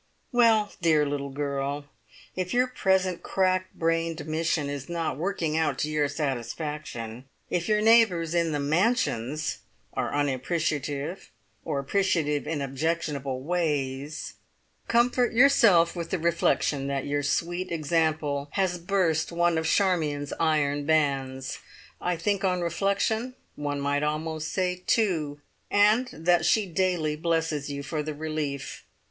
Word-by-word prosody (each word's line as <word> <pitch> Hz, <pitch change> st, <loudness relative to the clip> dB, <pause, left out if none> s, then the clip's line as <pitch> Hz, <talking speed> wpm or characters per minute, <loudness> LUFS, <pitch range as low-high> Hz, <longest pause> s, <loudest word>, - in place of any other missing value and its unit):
"Well, 225 Hz, -4 st, +4 dB
dear 155 Hz, -3 st, +4 dB
little 140 Hz, -1 st, -3 dB
girl, 140 Hz, 0 st, -3 dB, 0.5 s
if 185 Hz, +3 st, -2 dB
your 250 Hz, +1 st, +4 dB
present 190 Hz, -7 st, +1 dB
crack 185 Hz, -1 st, 0 dB
brained 165 Hz, -1 st, -1 dB
mission 160 Hz, -1 st, 0 dB
is 140 Hz, 0 st, -5 dB
not 170 Hz, -1 st, -2 dB
working 165 Hz, -1 st, -1 dB
out 160 Hz, -4 st, +1 dB
to 150 Hz, -, -1 dB
your 150 Hz, -1 st, +2 dB
satisfaction, 135 Hz, -3 st, -4 dB, 0.3 s
if 175 Hz, -1 st, 0 dB
your 210 Hz, 0 st, +3 dB
neighbours 210 Hz, -8 st, +4 dB
in 170 Hz, -2 st, +1 dB
the 150 Hz, -, 0 dB
`Mansions' 155 Hz, -, 0 dB, 0.2 s
(?) 110 Hz, -, -40 dB
are -, -, -2 dB
unappreciative 145 Hz, +3 st, -2 dB, 0.3 s
or 140 Hz, -, -2 dB
appreciative 150 Hz, -1 st, 0 dB
in 150 Hz, -3 st, -2 dB
objectionable 140 Hz, -2 st, -2 dB
ways 150 Hz, -3 st, -2 dB, 0.5 s
comfort 240 Hz, +1 st, +2 dB
yourself 230 Hz, -10 st, +5 dB
with 170 Hz, -1 st, -4 dB
the 190 Hz, -, 0 dB
reflection 160 Hz, -4 st, +1 dB
that 140 Hz, -1 st, -2 dB
your 145 Hz, 0 st, 0 dB
sweet 175 Hz, +5 st, -1 dB
example 155 Hz, -3 st, 0 dB
has 185 Hz, -3 st, 0 dB
burst 170 Hz, -3 st, +1 dB
one 170 Hz, 0 st, +2 dB
of 160 Hz, 0 st, 0 dB
Charmion's 155 Hz, -7 st, +1 dB
iron 145 Hz, -3 st, +1 dB
bands. 135 Hz, -3 st, 0 dB, 0.4 s
I 180 Hz, 0 st, 0 dB
think 200 Hz, +4 st, 0 dB
on 180 Hz, -2 st, +1 dB
reflection 200 Hz, +7 st, 0 dB, 0.2 s
one 145 Hz, -1 st, -3 dB
might 145 Hz, +1 st, 0 dB
almost 155 Hz, +1 st, -2 dB
say 180 Hz, -1 st, -1 dB
two, 160 Hz, -10 st, +1 dB, 0.3 s
and 215 Hz, +5 st, +4 dB
that 170 Hz, +1 st, +2 dB
she 215 Hz, +5 st, +3 dB
daily 175 Hz, -4 st, 0 dB
blesses 160 Hz, -3 st, -1 dB
you 140 Hz, 0 st, -4 dB
for 150 Hz, +2 st, -3 dB
the 150 Hz, 0 st, -5 dB
relief! 150 Hz, -2 st, -4 dB
160 Hz, 135 wpm, -27 LUFS, 145-180 Hz, 0.5 s, yourself